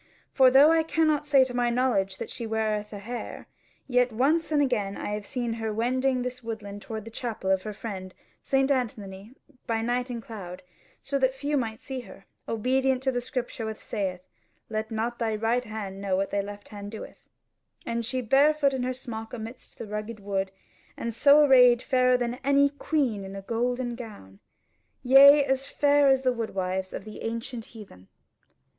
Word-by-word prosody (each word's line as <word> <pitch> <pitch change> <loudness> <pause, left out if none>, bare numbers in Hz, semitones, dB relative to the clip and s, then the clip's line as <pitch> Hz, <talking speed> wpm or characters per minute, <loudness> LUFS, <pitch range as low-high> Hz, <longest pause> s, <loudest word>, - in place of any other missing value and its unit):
For 260 -2 +6
though 275 +5 +7
I 325 0 +4
cannot 315 -2 +1
say 275 -3 +6
to 255 -1 -5
my 245 -1 +1
knowledge 235 -6 +1
that - - -6
she 230 - -5
weareth 215 -1 -1
a 205 - -6
hair; 235 +5 -7 0.4
yet 250 -1 +2
once 295 +9 +1
and 300 - +3
again 210 -8 0
have - - -6
I 210 0 -2
seen 240 +2 -3
her 220 -1 -1
wending 255 +3 0
this 250 0 -5
woodland 210 -3 -6
toward 220 -1 -6
the 230 - -9
chapel 220 -5 -3
of 190 -1 +2
her 215 - -5
friend 195 -3 -7 0.3
St. 270 0 +1
Anthony 215 -4 -3 0.3
by 225 -1 0
night 245 +2 -1
and 240 -1 -4
cloud, 190 -6 -9 0.4
so 275 0 -1
that 260 0 +2
few 290 +2 -2
might 225 -5 -2
see 265 -1 -5
her, 195 -5 -12 0.2
obedient 260 +3 +1
to 265 - +2
the 245 -1 -2
Scripture 245 -2 -4
which 220 -1 -5
sayeth, 190 -4 -4 0.5
'Let 220 0 -2
not 230 +1 -3
thy 225 -2 0
right 225 +3 0
hand 200 -3 -6
know 195 -2 0
what 195 +1 -1
thy 200 - +1
left 205 +1 -9
hand 205 -1 -8
doeth,' 220 0 -10 0.6
and 235 0 -2
she 255 +3 -2
barefoot 280 +3 +4
in 260 - -2
her 255 +1 -2
smock 225 -3 -7
amidst 230 +2 -8
the - - -6
rugged 210 +1 -5
wood, 195 -1 -2 0.5
and 235 0 -3
so 290 +5 +6
arrayed 250 -3 +6
fairer 255 -2 +3
than 245 +1 -3
any 280 +1 +4
queen 275 -7 -1
in 195 0 -8
a 195 - -7
golden 245 +3 -1
gown. 205 - -10 0.6
Yea, 280 +3 +8
as 265 0 0
fair 285 -1 +3
as 265 -1 +4
the 255 -1 +2
woodwives 190 -5 -3
of 195 - -7
the 215 - -9
ancient 230 +1 -4
heathen." 195 - -13
235 Hz, 190 wpm, -27 LUFS, 210-260 Hz, 0.6 s, Yea